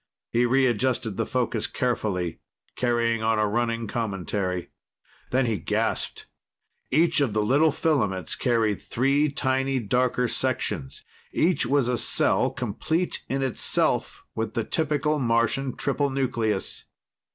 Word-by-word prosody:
He 120 Hz, +1 st, +3 dB
readjusted 125 Hz, -3 st, +1 dB
the -, -, -1 dB
focus 120 Hz, -3 st, -1 dB
carefully, 100 Hz, -8 st, -1 dB, 0.4 s
carrying 115 Hz, -2 st, +1 dB
on 110 Hz, 0 st, +2 dB
a 105 Hz, -, +3 dB
running 115 Hz, +2 st, 0 dB
commentary. 95 Hz, -4 st, -3 dB, 0.6 s
Then 130 Hz, 0 st, +2 dB
he 110 Hz, -5 st, -1 dB
gasped. -, -, -2 dB, 0.6 s
Each 165 Hz, +2 st, +3 dB
of 130 Hz, -7 st, +1 dB
the 105 Hz, 0 st, +1 dB
little 145 Hz, +8 st, +4 dB
filaments 115 Hz, -, 0 dB
carried 115 Hz, -5 st, +1 dB
three 140 Hz, +5 st, +1 dB
tiny 135 Hz, -1 st, 0 dB
darker 125 Hz, +2 st, +1 dB
sections; 65 Hz, -, -2 dB, 0.3 s
each 165 Hz, -6 st, +2 dB
was 135 Hz, -1 st, +2 dB
a 125 Hz, -2 st, 0 dB
cell, -, -, +2 dB
complete 170 Hz, +3 st, -2 dB
in 135 Hz, 0 st, 0 dB
itself, 130 Hz, -3 st, 0 dB
with 110 Hz, -1 st, -3 dB
the 115 Hz, -, +1 dB
typical 150 Hz, +1 st, 0 dB
Martian 120 Hz, +2 st, +1 dB
triple 140 Hz, 0 st, 0 dB
nucleus. 120 Hz, -6 st, -1 dB
120 Hz, 125 wpm, -25 LUFS, 110-135 Hz, 0.6 s, little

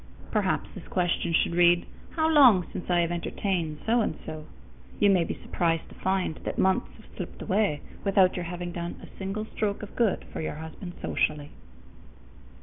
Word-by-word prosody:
_ -, -, -15 dB
Perhaps -, -, 0 dB
this -, -, -10 dB
question 175 Hz, -1 st, 0 dB
should 165 Hz, -, +2 dB
read, 175 Hz, 0 st, +5 dB, 0.3 s
"How 315 Hz, -1 st, +2 dB
long 255 Hz, -, +7 dB
since 180 Hz, -, -6 dB
I 175 Hz, -1 st, +4 dB
have 170 Hz, 0 st, 0 dB
entertained 170 Hz, -2 st, -2 dB
So 235 Hz, +2 st, +3 dB
and 160 Hz, -, -1 dB
So?" 155 Hz, -1 st, -6 dB, 0.5 s
You 205 Hz, -1 st, +5 dB
may 185 Hz, -3 st, +4 dB
be -, -, -3 dB
surprised 165 Hz, -2 st, -1 dB
to -, -, -13 dB
find 190 Hz, -4 st, 0 dB
that -, -, -5 dB
months 190 Hz, 0 st, +2 dB
have 220 Hz, -, -16 dB
slipped 180 Hz, -, -7 dB
away 190 Hz, -7 st, +1 dB, 0.2 s
without 195 Hz, -2 st, +4 dB
your 180 Hz, -, -3 dB
having 175 Hz, 0 st, -4 dB
done 170 Hz, 0 st, -4 dB
a -, -, -13 dB
single 195 Hz, +3 st, -3 dB
stroke 210 Hz, -1 st, -2 dB
of 210 Hz, -, -9 dB
good 230 Hz, -5 st, +1 dB
for -, -, -3 dB
your 155 Hz, -, -3 dB
husband 160 Hz, +3 st, -8 dB
socially. 150 Hz, -1 st, 0 dB
180 Hz, 185 wpm, -27 LUFS, 170-200 Hz, 0.5 s, long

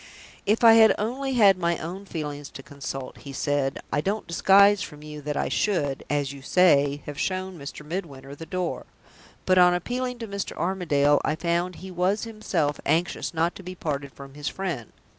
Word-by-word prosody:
"If 215 Hz, +4 st, +2 dB
I 225 Hz, -1 st, +9 dB
had 220 Hz, -2 st, +7 dB
only 260 Hz, +6 st, -2 dB
had 200 Hz, -6 st, +5 dB
my 170 Hz, -1 st, +1 dB
own 185 Hz, +5 st, -6 dB
feelings 145 Hz, -4 st, -5 dB
to 135 Hz, -, -9 dB
consult," 135 Hz, -2 st, -7 dB
he 140 Hz, -, -9 dB
said, 135 Hz, 0 st, -1 dB
"I 145 Hz, -, +2 dB
don't 205 Hz, +6 st, -2 dB
disguise 200 Hz, +3 st, +5 dB
from 150 Hz, 0 st, -8 dB
you 150 Hz, -1 st, -8 dB
that 145 Hz, 0 st, -3 dB
I -, -, 0 dB
should 145 Hz, -10 st, 0 dB
(as 145 Hz, -1 st, -1 dB
you 140 Hz, -, -11 dB
say) 145 Hz, -3 st, +3 dB
have 145 Hz, -1 st, -7 dB
shown 185 Hz, 0 st, -2 dB
Mr. 145 Hz, +1 st, -8 dB
Midwinter 145 Hz, -5 st, -6 dB
the 160 Hz, +3 st, -9 dB
door. 180 Hz, -2 st, -3 dB, 0.6 s
But 185 Hz, 0 st, +4 dB
on 180 Hz, 0 st, +6 dB
appealing 250 Hz, +7 st, -3 dB
to 230 Hz, -1 st, -6 dB
Mr. 200 Hz, -1 st, -5 dB
Armadale, 150 Hz, -6 st, +2 dB
I 155 Hz, -, 0 dB
found 170 Hz, +2 st, -1 dB
he 190 Hz, +2 st, -9 dB
was 185 Hz, +4 st, 0 dB
himself 190 Hz, -10 st, -2 dB
anxious 165 Hz, +4 st, 0 dB
not 165 Hz, +1 st, 0 dB
to -, -, -10 dB
be 185 Hz, 0 st, -8 dB
parted 140 Hz, -5 st, -4 dB
from 135 Hz, 0 st, -12 dB
his 145 Hz, 0 st, -6 dB
friend. 170 Hz, -, -4 dB
170 Hz, 190 wpm, -25 LUFS, 145-195 Hz, 0.6 s, I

